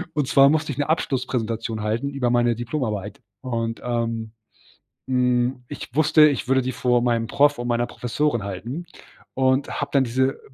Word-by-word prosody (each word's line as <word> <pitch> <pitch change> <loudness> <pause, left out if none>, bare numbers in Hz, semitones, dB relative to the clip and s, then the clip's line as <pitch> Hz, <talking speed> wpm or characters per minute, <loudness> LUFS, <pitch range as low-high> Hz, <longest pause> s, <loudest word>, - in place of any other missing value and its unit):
Und 145 -3 0
zwar 140 0 +6
musste 155 -1 0
ich 135 - -6
'ne 145 +1 -1
Abschlusspräsentation 115 -7 -1
halten 115 +6 -1
über 130 -4 -1
meine 120 -1 +2
Diplomarbeit 110 -4 -4 0.2
und, 115 -2 -3
ähm, 115 -2 -2 0.8
hm, 125 0 +1
ich - - -8
wusste, 155 +1 +6
ich 135 -3 -2
würde 130 0 +3
die 130 +1 -3
vor 125 -1 +1
meinem 120 -1 0
Prof 145 -1 +3
und 120 - -3
meiner 120 0 +1
Professorin 120 0 -1
halten 115 - -6 0.5
und 130 +1 +2
habe 140 - -3
dann 140 -2 +4
diese 130 +2 0
125 Hz, 165 wpm, -23 LUFS, 115-140 Hz, 0.8 s, zwar